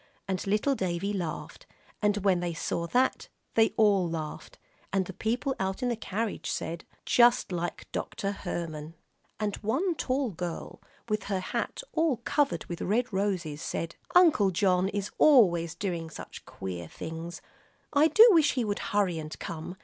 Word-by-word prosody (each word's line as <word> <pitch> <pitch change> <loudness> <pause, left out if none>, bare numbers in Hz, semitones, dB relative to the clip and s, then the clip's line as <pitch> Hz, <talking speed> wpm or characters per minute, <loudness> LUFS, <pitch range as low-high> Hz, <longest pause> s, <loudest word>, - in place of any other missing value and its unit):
And 190 0 -2
little 210 +8 +2
Davie 190 -2 -1
laughed; 175 -5 -5 0.3
and 210 -1 +2
when 185 -3 +4
they 175 -1 -2
saw 170 +2 -2
that, 255 +7 +1 0.3
they 225 0 +5
all 200 -5 +4
laughed, 155 -2 -6 0.3
and 190 -1 +1
the 190 - -7
people 245 +7 -1
out 190 +6 -2
in 250 - +1
the 240 - 0
carriage 220 0 -3
said, 165 0 -4 0.2
"Just 240 -4 +4
like 175 -1 -3
Dr. 200 - -3
Herman," 165 -5 -5 0.4
and 210 -2 -1
one 290 - 0
tall 265 -5 -1
girl, 175 -1 -6 0.3
with 215 -2 -1
her 195 -2 -1
hat 185 - -3
all 320 -5 +2
covered 280 +4 0
with 175 -3 -6
red 230 +4 0
roses, 180 -7 -1
said, 165 0 -3 0.2
"Uncle 320 - +6
John 185 0 +2
is 205 0 -3
always 175 - +5
doing 170 -3 -3
such - - -10
queer 90 -3 -6
things. 165 - -7 0.5
I 295 +2 +6
do 440 +8 +8
wish 320 -5 +5
he 250 -4 0
would 205 -1 -2
hurry 195 -5 +1
and 155 0 -7
come. 165 +3 -6
195 Hz, 160 wpm, -29 LUFS, 170-235 Hz, 0.5 s, do